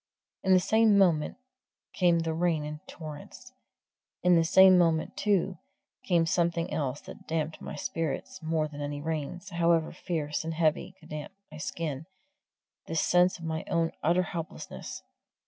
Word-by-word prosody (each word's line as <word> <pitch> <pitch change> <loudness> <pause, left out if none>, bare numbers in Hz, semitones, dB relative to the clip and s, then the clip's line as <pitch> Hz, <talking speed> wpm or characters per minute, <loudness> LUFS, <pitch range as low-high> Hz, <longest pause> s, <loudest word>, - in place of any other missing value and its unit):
In 190 - +2
the 185 - +7
same 220 +2 +4
moment 170 -6 +3 0.6
came 175 -2 +3
the 165 -1 -1
rain 165 -2 0
in 150 0 -6
torrents. 160 +11 -10 0.7
In 180 0 +5
the 165 - +5
same 190 +3 +7
moment, 165 -3 +2
too, 195 -4 +1 0.4
came 170 -3 +2
something 170 0 0
else 140 -2 -2
that - - -12
damped 160 -1 -2
my - - -6
spirits 165 +3 -4
more 160 -1 0
than 145 -1 -9
any 145 0 -3
rains, 160 +5 -4
however 170 -1 +2
fierce 155 -4 -3
and 165 0 -4
heavy, 165 +3 0
could - - -17
damp 150 +4 -6 0.2
my 155 - -9
skin 155 -2 -4 0.8
the 165 - -4
sense 180 +3 +3
of 165 - -9
my 160 0 -2
own 165 -1 +1
utter 175 +4 +3
helplessness. 165 -2 -7
165 Hz, 155 wpm, -29 LUFS, 155-180 Hz, 0.8 s, the